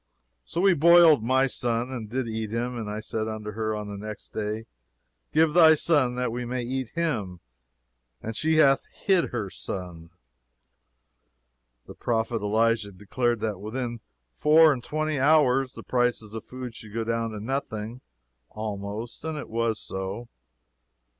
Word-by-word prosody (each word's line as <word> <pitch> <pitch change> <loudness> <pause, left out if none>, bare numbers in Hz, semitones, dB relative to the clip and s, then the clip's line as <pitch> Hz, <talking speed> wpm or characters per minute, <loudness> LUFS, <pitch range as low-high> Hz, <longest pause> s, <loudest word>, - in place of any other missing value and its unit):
So 170 - -3
we 195 0 +5
boiled 170 -4 +6
my 130 +3 +3
son, 120 -1 -1
and 115 -5 -6
did 125 +1 -2
eat 110 -1 -3
him; 120 +3 -2
and 110 -3 -4
I 105 +1 -4
said 110 0 -3
unto 110 -1 -5
her 110 0 -2
on 105 0 -4
the 100 -1 -6
next 110 0 -7
day, 110 +1 -4 0.7
Give 155 0 +3
thy 160 -2 +8
son 145 -6 +2
that 125 -1 -1
we 125 +1 -3
may 125 +1 -3
eat 130 0 -3
him; 110 - -2 0.8
and 115 0 -6
she 160 +6 +1
hath 140 -3 +5
hid 190 -4 +2
her 105 -6 -4
son." 85 -3 -6 1.8
The - - -10
prophet 115 -1 -1
Elisha 110 0 +1
declared 115 +4 -1
that 105 -4 -2
within 120 +2 -4 0.3
four 155 - +5
and 125 -3 -6
twenty 155 0 -2
hours 135 -3 +4
the - - -10
prices 120 -4 0
of 110 - -6
food 125 -2 -7
should 110 -1 -10
go 115 - 0
down 115 0 -1
to 110 -1 -6
nothing, 115 -1 -4 0.5
almost, 105 +2 -6
and 160 -1 -3
it 145 - -7
was 115 -1 0
so. 95 +5 -5
115 Hz, 160 wpm, -26 LUFS, 110-135 Hz, 1.8 s, thy